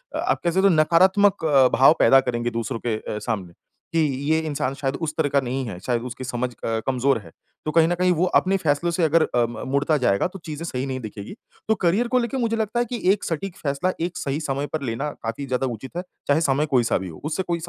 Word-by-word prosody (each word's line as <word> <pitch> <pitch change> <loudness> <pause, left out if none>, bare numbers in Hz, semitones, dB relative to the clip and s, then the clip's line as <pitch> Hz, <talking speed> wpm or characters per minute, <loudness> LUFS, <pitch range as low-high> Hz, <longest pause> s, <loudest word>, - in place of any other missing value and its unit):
आप - - 0
कह 175 - +2
सकते 190 +3 +3
हो - - +5
नकारात्मक 185 +4 +4
अ, 140 -4 +5
भाव 135 +4 +7
पैदा 135 - +7
करेंगे 120 -2 -1
दूसरों 115 +1 -3
के 115 - +1
अ, 105 0 -5
सामने 100 -6 -4 0.4
कि 165 - +2 0.3
ये 160 - +3
इंसान 150 -4 -2
शायद 135 -1 -1
उस 155 -2 -2
तरह 155 -3 +1
का 140 - +3
नहीं 130 +1 -3
है। 95 -6 -6
शायद 120 -2 0
उसकी 125 +2 -8
समझ 125 0 -2
अ, 115 -1 -3
कमज़ोर 135 0 +2
है। 85 -6 -14 0.3
तो 155 - -1
कहीं 165 0 +4
न 175 - 0
कहीं 180 +1 +2
वो 175 +2 +1
अपने 195 +1 0
फैसलों 165 -1 0
से 170 +1 0
अगर 160 +1 +4
अ, 120 -5 +1
म 120 - -7
मुड़ता 145 +2 +2
जाएगा 120 -4 +2
तो 190 +2 -11
चीज़ें 155 0 -6
सही 130 -5 -3
नहीं 130 -1 -3
दिखेगी। 105 - -8 0.3
तो 220 - +3
करियर 195 +6 +1
को 250 +1 +2
लेके 240 +2 -2
मुझे 230 -3 0
लगता 220 +2 -1
है 240 - +2
कि 240 0 -5
एक 205 - 0
सटीक 170 +3 -4
फैसला 145 +6 -1
एक 175 +1 -2
सही 145 -4 -2
समय 140 -1 -2
पर 155 - -1
लेना 135 +3 -2
काफ़ी 115 +5 -4
ज़्यादा 130 0 -1
उचित 125 +6 -7
है। 180 - -2 0.2
चाहे 145 +3 +3
समय 145 -1 +2
कोई-सा 125 -6 +2
भी 95 - -5
हो, 80 - -12
उससे 160 +5 -1
कोई 170 -1 -2
145 Hz, 250 wpm, -23 LUFS, 125-175 Hz, 0.4 s, भाव